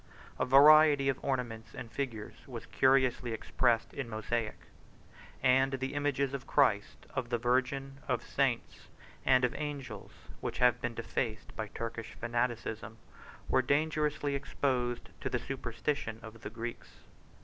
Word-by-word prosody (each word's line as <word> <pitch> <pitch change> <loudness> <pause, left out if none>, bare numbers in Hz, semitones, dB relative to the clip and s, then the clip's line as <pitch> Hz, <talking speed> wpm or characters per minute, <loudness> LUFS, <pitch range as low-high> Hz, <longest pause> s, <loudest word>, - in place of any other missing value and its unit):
A - - +2
variety 145 +1 +7
of 135 - -2
ornaments 120 -4 -3
and 125 -4 -7
figures 115 -6 -4
was 120 -4 -7
curiously 130 -3 +3
expressed 115 0 +1
in 135 -4 -4
mosaic; 110 0 -2 0.9
and 135 +1 +4
the 130 +1 -2
images 140 -2 0
of 135 -1 -5
Christ, 105 -8 +2
of 130 -3 -2
the 120 - +1
Virgin, 130 +3 0
of 125 -3 0
saints, 135 -4 -1 0.4
and 130 -1 +6
of 125 - -1
angels, 145 -3 -5 0.3
which - - -4
have 125 -1 +4
been 120 -1 -2
defaced 115 -1 -3
by 110 - -3
Turkish 115 0 -6
fanaticism, 120 -2 -2 0.5
were 130 - +3
dangerously 150 +1 +1
exposed 125 -3 -1
to - - -2
the - - 0
superstition 120 -1 -3
of 110 0 -10
the - - -5
Greeks. 115 +1 -6
125 Hz, 140 wpm, -32 LUFS, 115-135 Hz, 0.9 s, variety